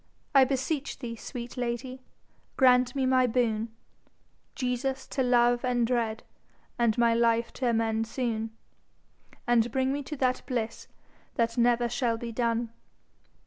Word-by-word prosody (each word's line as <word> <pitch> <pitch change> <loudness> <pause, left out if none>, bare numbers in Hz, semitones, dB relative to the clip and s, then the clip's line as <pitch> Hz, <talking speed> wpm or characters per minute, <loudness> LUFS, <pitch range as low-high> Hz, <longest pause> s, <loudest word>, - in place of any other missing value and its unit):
I 270 -2 +7
beseech 275 +2 -2
thee, 240 -4 -6
sweet 240 +2 -8
lady, 250 +1 -3 0.6
grant 250 0 +4
me 270 -1 +1
my 255 -1 +4
boon 225 -2 0 0.8
Jesus 265 0 -2
to 270 - -1
love 245 -1 +3
and 245 -2 +1
dread, 230 -2 -1 0.6
and 235 -2 +2
my 235 -1 +4
life 230 0 +2
to 255 -3 -1
amend 225 -1 0
soon, 225 -2 -2 1.0
And 240 -1 +3
bring 265 +1 +1
me 290 - -2
to 300 +2 -6
that 255 -1 +1
bliss 230 -4 -3 0.5
that 230 0 0
never 240 0 +3
shall 235 -1 0
be 235 0 -6
done. 230 0 -1
240 Hz, 140 wpm, -28 LUFS, 230-255 Hz, 1.0 s, I